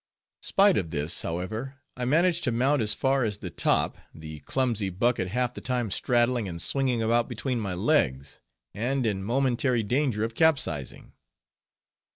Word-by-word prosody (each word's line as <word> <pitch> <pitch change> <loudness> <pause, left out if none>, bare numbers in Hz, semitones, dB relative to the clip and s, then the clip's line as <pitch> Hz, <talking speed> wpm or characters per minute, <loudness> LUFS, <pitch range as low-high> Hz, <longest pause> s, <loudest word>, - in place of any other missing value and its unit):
Spite 200 -1 +4
of 85 -5 -4
this, 75 0 -1
however, 110 +11 -4 0.2
I 125 - -3
managed 170 +6 +2
to 125 - +1
mount 130 +4 +2
as 110 -1 +2
far 135 0 +1
as 105 -3 -1
the - - -7
"top," - - +1 0.2
the 80 -1 -9
clumsy 115 - -1
bucket 95 +1 0
half 125 +5 -1
the - - -8
time 125 -5 -2
straddling 120 0 +1
and 85 -2 -6
swinging 125 - 0
about 115 +1 +1
between 130 -3 -2
my 100 -4 -3
legs, 75 - 0 0.3
and 125 +4 -1
in 100 -3 -1
momentary 125 +1 +1
danger 120 -1 0
of 115 +1 -3
capsizing. 130 - 0
120 Hz, 160 wpm, -27 LUFS, 100-130 Hz, 0.3 s, Spite